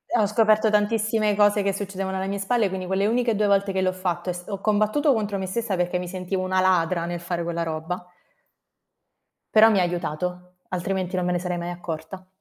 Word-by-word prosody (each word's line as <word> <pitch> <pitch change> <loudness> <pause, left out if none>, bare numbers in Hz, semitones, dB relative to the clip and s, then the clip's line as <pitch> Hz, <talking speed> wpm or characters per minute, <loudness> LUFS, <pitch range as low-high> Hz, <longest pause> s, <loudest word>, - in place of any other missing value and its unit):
Ho 215 - +4
scoperto 215 +1 +3
tantissime 215 0 +1
cose 205 0 +4
che 195 0 +1
succedevano 195 -1 -4
alle 190 +1 -2
mie 200 0 -3
spalle, 210 +1 +1
quindi 185 0 -4
quelle 190 +1 +1
uniche 235 0 +1
2 210 0 +2
volte 200 0 +2
che 190 - 0
l'ho 185 - +2
fatto 185 -1 -3
è 180 - 0
s 180 0 -9
ho 200 -2 -4
combattuto 215 +8 +2
contro 205 -3 -1
me 190 - -3
stessa 220 +1 -2
perché 180 0 0
mi 180 - -5
sentivo 185 +1 -3
una 185 0 +1
ladra 175 -2 +2
nel 175 0 -4
fare 170 0 -3
quella 170 0 -2
roba. 165 +3 -5 1.5
Però 220 +1 +8
mi 200 - +3
ha 180 - +3
aiutato, 180 +1 -4
altrimenti 185 0 -2
non 180 - 0
me 180 - +1
ne 175 - 0
sarei 180 0 -3
mai 170 0 -4
accorta. 175 +2 -7
190 Hz, 215 wpm, -24 LUFS, 180-205 Hz, 1.5 s, Però